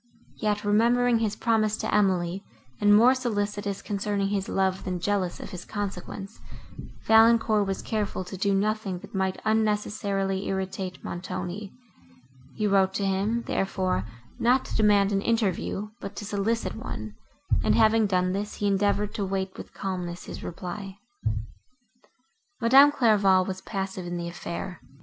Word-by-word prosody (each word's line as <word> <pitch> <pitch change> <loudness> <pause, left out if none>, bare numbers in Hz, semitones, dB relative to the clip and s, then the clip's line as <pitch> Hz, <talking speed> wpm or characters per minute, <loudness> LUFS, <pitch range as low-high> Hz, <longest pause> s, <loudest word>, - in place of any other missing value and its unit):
Yet, 210 -1 -1
remembering 235 +3 +3
his 215 -2 0
promise 215 -2 +1
to - - -3
Emily, 190 -2 +1 0.4
and 205 0 +4
more 240 +5 +7
solicitous, 205 -5 -2
concerning 200 -1 -1
his 200 -1 -2
love, 190 -1 0
than 180 -1 -3
jealous 190 -1 -1
of - - -8
his 180 -2 -7
consequence, 200 0 -6 0.7
Valancourt 220 -2 +5
was 195 -1 -3
careful 210 -3 -2
to 185 +2 -8
do 195 +1 +1
nothing 210 -1 0
that - - -13
might 190 -1 -1
unnecessarily 205 -3 0
irritate 190 -1 -4
Montoni, 185 +3 -5 0.8
he 215 - -1
wrote 195 -1 +3
to 200 - 0
him, 200 +5 0
therefore, 185 - -1 0.4
not 250 +3 +3
to - - -5
demand 205 -2 +4
an 195 -1 +1
interview, 210 -2 -1
but 200 - -7
to 205 - -6
solicit 210 +3 -1
one, 110 - -6 0.5
and, - - +3
having 220 -1 +4
done 185 -1 +1
this, 200 +2 -3
he 205 - -3
endeavoured 205 +1 +1
to 205 - -2
wait 190 0 -2
with - - -9
calmness 180 -3 -4
his - - -8
reply. 190 +3 -6 1.6
Madame 270 +5 +7
Clairval 200 -8 +4
was 185 0 -5
passive 190 -3 -4
in 175 0 -3
the 170 0 -4
affair. 170 0 -6
200 Hz, 145 wpm, -26 LUFS, 190-215 Hz, 1.6 s, more